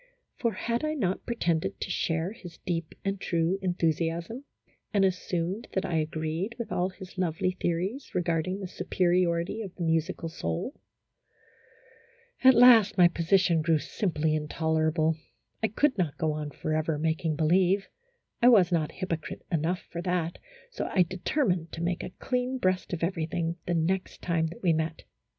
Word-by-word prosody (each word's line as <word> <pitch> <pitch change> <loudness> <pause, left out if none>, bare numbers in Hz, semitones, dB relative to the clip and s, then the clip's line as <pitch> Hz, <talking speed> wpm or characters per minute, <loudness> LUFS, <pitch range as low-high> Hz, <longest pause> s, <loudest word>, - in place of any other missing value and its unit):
For, 235 -3 0
had 235 +3 -2
I 310 0 0
not 195 -9 -1
pretended 170 -9 0
to - - -3
share 165 +3 0
his 180 -7 -11
deep 165 -3 -2
and 195 -1 -1
true 170 +3 0
enthusiasm, 170 - -1 0.5
and 200 -2 +3
assumed 180 +2 -2
that 190 - 0
I 165 - 0
agreed 160 +7 -2
with 235 - -5
all 180 +1 +1
his 185 0 -11
lovely 185 +1 0
theories 185 +8 -2
regarding 175 +1 0
the 190 - -5
superiority 180 +1 +1
of 195 -4 -7
the 175 - -4
musical 165 0 0
soul? 85 - -3 1.7
At 260 -1 +8
last 230 -4 +7
my 175 -1 +7
position 170 -1 +3
grew 160 0 +3
simply 160 -1 -1
intolerable. 160 +1 +1 0.4
I 220 - +3
could 265 +6 +2
not 165 -6 0
go 160 -2 +1
on 150 -1 -4
forever 155 +1 -1
making 160 0 0
believe, 185 +5 +3 0.5
I 245 - +8
was 195 -7 +6
not 160 -3 0
hypocrite 175 -4 -4
enough 170 +2 0
for 170 - -4
that, 175 -2 -1 0.3
so - - -3
I 185 - +5
determined 180 - -1
to 165 - -4
make 175 0 -1
a - - -5
clean 250 0 -1
breast 185 -5 0
of 170 -2 -3
everything 170 -1 -1
the 175 - +1
next 185 +3 -1
time 165 -2 +1
that 165 +3 -10
we 170 -3 +4
met. 160 0 -2
175 Hz, 160 wpm, -28 LUFS, 160-190 Hz, 1.7 s, At